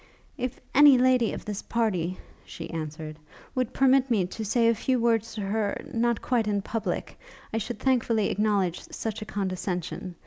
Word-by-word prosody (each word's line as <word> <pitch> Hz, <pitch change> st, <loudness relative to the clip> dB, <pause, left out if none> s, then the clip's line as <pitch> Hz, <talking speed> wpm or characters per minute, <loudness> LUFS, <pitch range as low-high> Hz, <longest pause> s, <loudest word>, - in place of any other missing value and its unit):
'If 255 Hz, -1 st, -4 dB
any 285 Hz, -1 st, +8 dB
lady 250 Hz, -2 st, +3 dB
of -, -, -6 dB
this 210 Hz, -1 st, -4 dB
party,' 185 Hz, -6 st, -1 dB, 0.3 s
she -, -, -8 dB
answered, 155 Hz, -1 st, -6 dB, 0.3 s
'would 255 Hz, -2 st, -1 dB
permit 265 Hz, 0 st, +4 dB
me 210 Hz, -6 st, +2 dB
to 205 Hz, +5 st, -6 dB
say 230 Hz, +2 st, +2 dB
a 230 Hz, -, +5 dB
few 255 Hz, +3 st, 0 dB
words 230 Hz, -1 st, +1 dB
to 215 Hz, -, -3 dB
her 205 Hz, +1 st, -1 dB
not 235 Hz, -1 st, +1 dB
quite 235 Hz, -4 st, +1 dB
in 205 Hz, -2 st, 0 dB
public, 225 Hz, +1 st, -3 dB, 0.3 s
I 225 Hz, -, +1 dB
should 235 Hz, +3 st, -4 dB
thankfully 235 Hz, -5 st, +1 dB
acknowledge 200 Hz, -4 st, +1 dB
such 220 Hz, -1 st, -4 dB
a -, -, -4 dB
condescension. 185 Hz, -2 st, -3 dB
220 Hz, 170 wpm, -27 LUFS, 195-240 Hz, 0.3 s, any